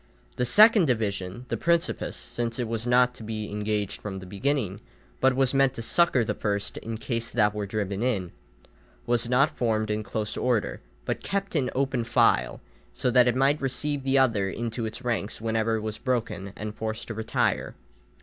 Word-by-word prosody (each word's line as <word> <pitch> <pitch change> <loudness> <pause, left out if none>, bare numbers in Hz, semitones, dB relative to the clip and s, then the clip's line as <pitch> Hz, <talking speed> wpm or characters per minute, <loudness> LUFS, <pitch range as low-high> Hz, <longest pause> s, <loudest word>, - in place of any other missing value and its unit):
The 125 - +1
second 210 - +7
division, 105 -2 -2
the - - -1
principes, 170 0 0
since 115 -1 -4
it 120 -2 -1
was 115 +1 -2
not 125 0 +4
to 115 - -11
be 110 -1 -4
engaged 105 -1 -2
from 100 -2 -5
the 95 - -8
beginning, 100 0 -1 0.4
but 130 -1 +3
was 135 0 +2
meant 135 -1 +3
to 115 - -5
succour 135 -1 +3
the - - -1
first 100 -1 -2
in 115 0 -5
case 115 0 -3
that 105 -3 +2
were 105 -1 -3
driven 100 -1 -2
in, 100 -8 0 0.7
was 120 -1 +1
not 135 +4 +3
formed 110 -3 0
in 105 0 -1
close 105 0 -4
order 120 -4 0 0.2
but - - -2
kept 200 -1 -3
in 130 -5 +2
open 130 -2 0
file, 115 - +2 0.3
so 125 - 0
that 125 0 +6
it 120 - +2
might 135 +3 +2
receive 140 +2 -1
the 135 +1 +2
other 110 -7 +3
into 115 +2 -3
its 110 +4 -7
ranks 115 -4 -2
whenever 115 0 0
it 110 - -2
was 110 0 -5
broken 115 -7 -2
and 105 0 -5
forced 110 0 -4
to - - -3
retire. 110 0 -1
115 Hz, 190 wpm, -26 LUFS, 105-130 Hz, 0.7 s, second